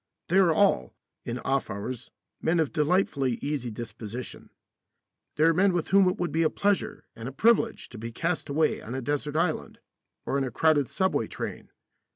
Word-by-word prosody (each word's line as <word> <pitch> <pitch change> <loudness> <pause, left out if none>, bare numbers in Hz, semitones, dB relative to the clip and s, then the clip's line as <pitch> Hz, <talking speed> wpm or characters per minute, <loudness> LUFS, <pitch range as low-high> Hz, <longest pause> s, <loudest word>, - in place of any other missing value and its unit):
They 185 +3 +4
are 180 -4 +5
all, 175 - +2 0.3
in 120 - -3
off 135 +2 -1
hours, 110 +4 -5 0.3
men 165 +1 +2
of 155 -4 0
delightfully 150 -5 +1
easy 140 -1 -3
disposition. 115 +1 -7 0.9
They 150 - +2
are 165 +1 +6
men 190 +3 +3
with 175 -2 -1
whom 195 0 +5
it 180 - -2
would 175 -1 -2
be 165 - +1
a 160 - +4
pleasure 200 +3 -1
and 115 +3 -6
a - - -8
privilege 225 - +2
to 120 - -10
be 115 +1 -5
cast 165 +7 -2
away 155 +2 +1
on 120 +4 -6
a 135 - -2
desert 145 +2 -2
island 160 0 -1 0.5
or 140 - 0
in - - 0
a 130 - -2
crowded 145 +2 +2
subway 190 -1 0
train. - - -6
150 Hz, 190 wpm, -27 LUFS, 125-175 Hz, 0.9 s, are